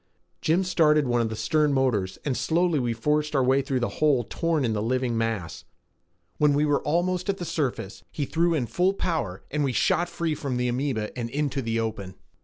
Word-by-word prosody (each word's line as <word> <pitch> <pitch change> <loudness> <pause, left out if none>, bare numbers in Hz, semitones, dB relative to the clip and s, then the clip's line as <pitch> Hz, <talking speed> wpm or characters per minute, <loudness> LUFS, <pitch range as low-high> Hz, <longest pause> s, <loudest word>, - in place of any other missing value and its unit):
Jim 170 +4 +2
started 155 -5 +3
one 120 -1 +2
of 115 - 0
the 110 - -4
stern 150 +8 +1
motors 125 -9 0
and 140 -3 0
slowly 170 +1 +1
we 120 -2 0
forced 150 +6 0
our 135 - +3
way 135 +2 +3
through 135 -1 -1
the 120 - -3
hole 145 -5 +4
torn 160 +3 -1
in 115 - 0
the 105 - -1
living 125 +1 0
mass. 115 -8 -2 0.8
When 150 -1 +4
we 150 +1 +2
were 145 -1 +2
almost 180 +4 0
at 195 - 0
the 175 - -5
surface, 130 - -3
he 145 - -3
threw 165 +3 +1
in 135 -6 0
full 185 - +1
power 140 - -2
and 150 +1 0
we 135 -3 0
shot 175 +8 +2
free 165 -2 -2
from 140 -4 -3
the 125 0 0
amoeba 125 -3 -2
and 120 -2 -3
into 140 +1 -1
the 115 -1 -1
open. 105 -4 -4
140 Hz, 210 wpm, -26 LUFS, 115-155 Hz, 0.8 s, hole